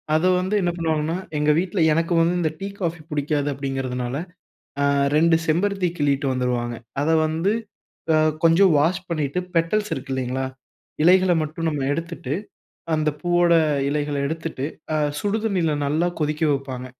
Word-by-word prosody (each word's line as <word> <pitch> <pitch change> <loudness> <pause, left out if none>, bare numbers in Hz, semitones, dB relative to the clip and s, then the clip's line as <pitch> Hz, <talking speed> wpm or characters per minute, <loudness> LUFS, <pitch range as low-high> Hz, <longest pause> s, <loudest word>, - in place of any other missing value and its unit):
அத 160 +3 +2
வந்து 190 +3 -1
என்ன 175 - +1
பண்ணுவாங்கன்னா, 160 0 0 0.2
எங்க 150 +1 +3
வீட்ல 185 +1 -2
எனக்கு 165 +2 0
வந்து 170 +2 +2
இந்த 160 -3 0
டீ, 195 - -4
காஃபி 170 -1 -2
பிடிக்காது 145 0 0
அப்டிங்கிறதுனால 130 -2 -3 0.7
ஆ - - +2 0.3
2 165 +1 +5
செம்பருத்தி 185 +3 +1
கிள்ளிட்டு 140 -1 +1
வந்துருவாங்க, 125 -2 -1 0.3
அத 160 - +1 0.2
வந்து 165 +6 0 0.6
ஆ - - +5 0.3
கொஞ்சம் 170 +3 +5
வாஷ் 175 +5 +1
பண்ணிட்டு 150 -1 -1 0.2
பெட்டல்ஸ் 210 +6 +1
இருக்கு 135 0 -6
இல்லைங்களா? 130 0 -2 0.6
இலைகள 185 +2 +5
மட்டும் 155 +2 -4
நம்ம 150 -3 -2
எடுத்துட்டு, 165 -4 -4 0.6
அந்த 155 -1 +1
பூவோட 175 +1 +3 0.4
இலைகள 145 0 -1
எடுத்துட்டு 160 -3 -4 0.3
அ - - +2 0.2
சுடுதண்ணீல 205 -6 0
நல்லா 155 +5 +1 0.2
கொதிக்க 150 +2 -2
வைப்பாங்க. 130 -2 -4
160 Hz, 140 wpm, -23 LUFS, 140-175 Hz, 0.7 s, 2